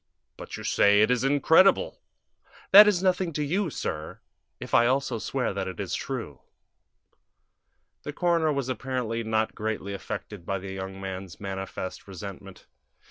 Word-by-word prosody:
"But - - -8
you - - -8
say 105 +1 +4
it 110 - +2
is 125 0 +1
incredible." 160 - +4 0.7
"That 210 +2 +11
is 190 -3 +2
nothing 185 -2 +1
to 150 - -1
you, 180 +5 0
sir, 80 - -5 0.4
if - - -9
I 120 0 +5
also 130 -2 0
swear 125 -1 -2
that 95 -1 -3
it 95 -2 -7
is - - -4
true." - - -5 1.6
The 145 - -6
coroner 165 -1 +1
was 140 -3 -2
apparently 125 -2 -3
not 110 0 0
greatly 105 -2 -4
affected 100 -1 -7
by 95 +3 -2
the 95 0 -7
young 95 0 -6
man's 95 -2 -7
manifest 95 -1 -6
resentment. 95 0 -9
110 Hz, 150 wpm, -26 LUFS, 95-145 Hz, 1.6 s, That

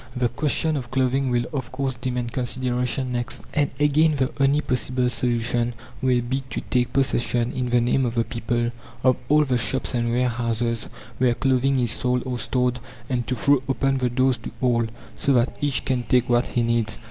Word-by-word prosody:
The 125 -1 +1
question 150 +2 0
of 125 -3 -5
clothing 130 +1 +1
will 120 -1 +1
of 130 -4 -4
course 130 0 -1
demand 125 -1 -3
consideration 125 +1 -1
next, 120 0 -3
and 145 -2 +2
again 150 +1 +4
the 130 -2 0
only 140 +2 +4
possible 125 -2 0
solution 120 0 0 0.3
will 125 -2 +3
be 130 +3 -2
to - - -3
take 125 -1 0
possession, 120 -3 +1
in 125 -2 -2
the 120 0 +4
name 125 +3 +2
of 115 - -4
the 115 - +2
people, 120 +1 -2 0.3
of 130 -1 +4
all 150 +1 +5
the 125 -3 +1
shops 115 +5 -1
and 120 -1 0
warehouses 115 -1 0 0.3
where 125 -2 +3
clothing 135 +1 +2
is 120 -3 +1
sold 125 +1 0
or 125 -2 -3
stored, 125 0 0 0.3
and 120 -2 -1
to 130 - -1
throw 140 +3 +3
open 135 0 +1
the 125 -1 +1
doors 130 +1 +2
to 115 - -8
all, 120 -2 +2 0.3
so 140 - +2
that 120 -1 +2
each 145 -3 -1
can 130 -2 0
take 125 0 +2
what 120 +1 +2
he 120 - 0
needs. 115 -1 0
125 Hz, 195 wpm, -24 LUFS, 120-130 Hz, 0.3 s, all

